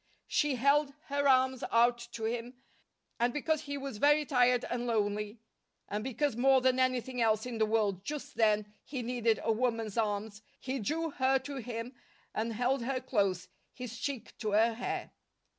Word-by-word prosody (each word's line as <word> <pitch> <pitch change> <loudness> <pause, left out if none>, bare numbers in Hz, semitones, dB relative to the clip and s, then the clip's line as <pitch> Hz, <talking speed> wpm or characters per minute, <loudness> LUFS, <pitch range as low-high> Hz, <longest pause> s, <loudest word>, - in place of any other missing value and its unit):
She 295 -3 +1
held 280 +3 +3 0.2
her 285 0 +1
arms 260 -1 +3
out 240 +1 +4
to 225 - -6
him, 235 +2 -3 0.6
and 240 +1 +2
because 305 +3 0
he 285 0 -5
was 270 -6 -6
very 295 +3 +4
tired 250 -3 +3
and 245 0 -2
lonely, 210 -1 -1 0.5
and 210 +1 -3
because 265 +1 -1
more 265 +2 +5
than 260 0 +2
anything 255 -1 0
else 220 -1 +2
in 240 -3 -5
the 220 - +3
world 210 -4 +1
just 295 +5 -5
then 210 -2 +2
he 260 -3 -5
needed 235 -2 +1
a 225 - +2
woman's 225 -2 0
arms, 210 -1 -2 0.2
he 260 +1 -3
drew 320 +8 -1
her 265 0 +2
to 280 +1 -6
him 240 0 -5 0.4
and 225 +1 -2
held 250 +3 +1
her 255 +2 -1
close, 200 -8 0 0.3
his 245 -2 -7
cheek 255 -5 -4
to 215 -2 -2
her 225 +2 +4
hair. 245 +2 -4
245 Hz, 175 wpm, -31 LUFS, 220-265 Hz, 0.6 s, more